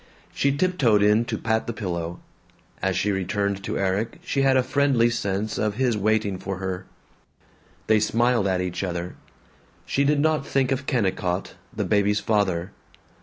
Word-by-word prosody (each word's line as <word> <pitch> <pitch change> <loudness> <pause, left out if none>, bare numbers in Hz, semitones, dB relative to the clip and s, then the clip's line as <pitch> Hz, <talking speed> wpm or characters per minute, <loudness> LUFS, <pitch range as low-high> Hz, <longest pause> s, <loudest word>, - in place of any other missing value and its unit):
She 140 - +2
tiptoed 135 - +3
in 105 +3 +4
to 115 -2 -3
pat 110 0 -1
the 115 - -2
pillow. 85 -5 -4 0.6
As - - 0
she 105 - +1
returned 100 +1 -1
to - - -3
Erik 100 +4 -1
she 140 - -1
had 135 -1 +4
a 130 - +3
friendly 130 -3 +2
sense 105 -2 -2
of 105 -2 0
his 125 -1 +1
waiting 105 -2 0
for 95 0 -4
her. 95 0 -4 1.0
They 110 -1 +4
smiled 115 0 +2
at 95 -1 +1
each 90 +1 -3
other. 90 -1 -4 0.7
She 140 - +1
did 145 +1 +2
not 155 0 +2
think 135 -1 0
of 135 +1 -2
Kennicott, 95 -7 -1 0.2
the - - -3
baby's 105 0 +2
father. 100 -5 0
105 Hz, 165 wpm, -24 LUFS, 95-125 Hz, 1.0 s, in